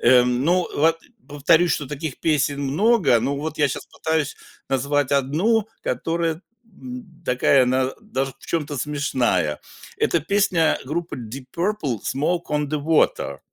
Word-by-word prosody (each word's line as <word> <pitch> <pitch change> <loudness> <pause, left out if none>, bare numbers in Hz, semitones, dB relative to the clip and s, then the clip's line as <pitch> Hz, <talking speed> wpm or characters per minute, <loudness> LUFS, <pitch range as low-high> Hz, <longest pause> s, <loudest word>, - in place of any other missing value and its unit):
эм, 125 +1 +4
ну 180 +2 +2
вот, 165 +2 +3
э, - - -22 0.2
повторюсь, 155 +4 +3
что 145 - -2
таких 145 0 -5
песен 145 -2 +1
много, 175 - +3
но 140 +4 -1
вот 155 +2 -4
я 145 - +4
щас - - -5
пытаюсь 160 -2 -2 0.3
назвать 140 +1 0
одну, 175 - +2
которая, 165 -1 -1 0.2
м, 225 -5 -11
такая 130 +1 +4
она 130 +1 +1
даже 135 -12 -3
в - - -16
чем-то 150 -3 -2
смешная. 125 - 0 0.4
Эта 170 - +2
песня 180 -2 +2
группы 165 +5 -3
Deep 125 +2 -8
Purple 170 - -1
"Smoke 165 +6 0
on 150 -1 0
the 150 0 -2
Water". 150 - +1
150 Hz, 145 wpm, -22 LUFS, 135-170 Hz, 0.4 s, эм